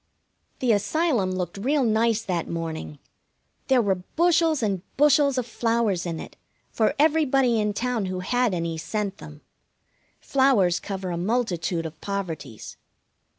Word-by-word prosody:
The 250 -2 +3
Asylum 210 - +1
looked 180 0 -4
real 275 +6 +1
nice 225 -1 +2
that 175 -3 -2
morning. 160 -3 -5 0.7
There 260 -3 +4
were 190 -3 0
bushels 330 -4 +3
and 195 -4 0 0.2
bushels 290 -1 +4
of 250 - 0
flowers 230 -6 0
in 165 -2 -4
it, - - -10 0.3
for 220 - +1
everybody 275 -6 +3
in 210 0 +1
town 235 0 -1
who 185 -1 -3
had 245 0 +1
any 165 -1 -3
sent 200 +3 -3
them. 150 0 -11 0.8
Flowers 235 -11 +3
cover 190 -2 -5
a 170 - -2
multitude 180 -4 -1
of 155 -1 -8
poverties. 165 - -5
210 Hz, 140 wpm, -25 LUFS, 180-255 Hz, 0.8 s, There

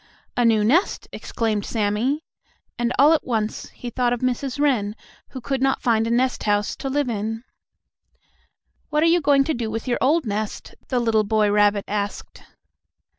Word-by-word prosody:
"A 245 - +2
new 225 -2 +4
nest!" 310 - +1
exclaimed 215 -3 -2
Sammie, 225 +9 -1 0.5
and, 240 0 0
all 295 +4 +6
at 320 - +1
once, 220 -3 -2
he 245 - -8
thought 245 0 +1
of 245 - -4
Mrs. 255 +1 -2
Wren, 230 -8 +1 0.3
who 260 - -7
could 265 +1 -3
not 270 0 +1
find 225 -2 +2
a - - -1
nest 250 +2 +1
house 205 0 +1
to 270 - -4
live 285 0 0
in. 225 0 -3 1.5
"What 300 0 +1
are - - +4
you 335 +1 +4
going 280 -2 +4
to 315 - -1
do 235 -4 -3
with 225 +3 -5
your 245 - 0
old 300 +3 +2
nest?" 210 0 -4
the 255 - 0
little 225 -2 +2
boy 210 0 +2
rabbit 205 -1 +3
asked. 205 0 -4
235 Hz, 175 wpm, -22 LUFS, 215-270 Hz, 1.5 s, all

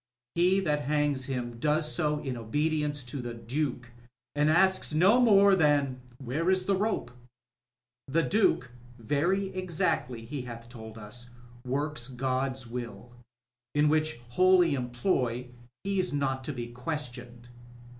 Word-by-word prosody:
He 180 +3 +3
that 150 -5 0
hangs 145 -2 +1
him 120 -3 -4
does 150 +2 +1
so 150 -3 0
in 130 -3 -3
obedience 145 +5 -1
to 125 +3 -7
the 120 -1 -6
Dtike, 120 +1 -3 0.4
and 150 +1 +2
asks 190 -1 +3
no 195 +10 +5
more 200 -4 +6
than 145 -6 +2
* 120 - -23
Where 155 +9 0
is 185 -1 +2
the 195 - +2
rope 200 - -1 0.5
?" 120 0 -64
The 165 +5 +2
Duke, 160 - +2 0.3
very 170 - 0
exactly 155 -10 -1
he 140 +3 -5
hath 120 -1 -9
told 110 -2 -10
us, 115 +3 -7 0.4
works 140 -1 -2
God's 130 0 -1
will, 120 -1 -7 0.6
in 150 0 +4
which 155 -3 +1
holy 180 +3 +4
employ 125 -1 -1 0.3
he's 195 -2 0
not 135 -2 -1
to 150 - -2
be 120 -3 -5
questioned. 120 -2 -6
140 Hz, 140 wpm, -29 LUFS, 120-160 Hz, 0.6 s, more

